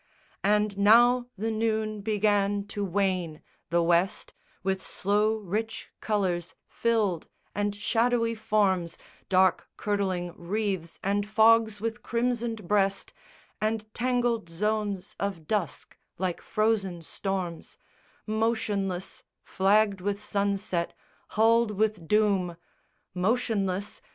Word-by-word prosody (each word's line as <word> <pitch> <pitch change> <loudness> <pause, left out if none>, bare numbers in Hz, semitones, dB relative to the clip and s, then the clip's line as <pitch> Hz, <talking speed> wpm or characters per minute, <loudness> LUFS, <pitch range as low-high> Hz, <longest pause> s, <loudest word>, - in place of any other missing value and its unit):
And 210 0 +2
now 240 +4 +6
the 225 +3 -1
noon 215 -1 -1
began 205 -1 +1
to 205 - -3
wane; 185 -4 -1 0.3
the 170 +1 +2
west 175 +4 +1 0.3
With 190 0 -1
slow 210 +3 +1
rich 215 +2 -4
colours 185 -5 -1
filled 215 -8 0 0.3
and 205 0 -1
shadowy 230 +2 +1
forms, 205 -6 +1 0.3
Dark 190 0 +3
curdling 190 -4 -1
wreaths 190 -2 -3
and 200 +1 0
fogs 220 0 +4
with 225 0 -3
crimsoned 235 -3 -1
breast, 195 -1 +1 0.5
And 215 0 -2
tangled 240 -5 0
zones 205 +1 -2
of 195 -5 -3
dusk 205 -6 -2 0.2
like 180 -1 -2
frozen 200 -6 0
storms, 185 -1 -4 0.5
Motionless, 215 -4 -1 0.2
flagged 200 0 +2
with 200 +2 -2
sunset, 200 -4 -1 0.3
hulled 225 +1 +3
with 210 -5 0
doom! 195 -4 +2 0.6
Motionless? 200 -1 -1
205 Hz, 100 wpm, -27 LUFS, 190-220 Hz, 0.6 s, now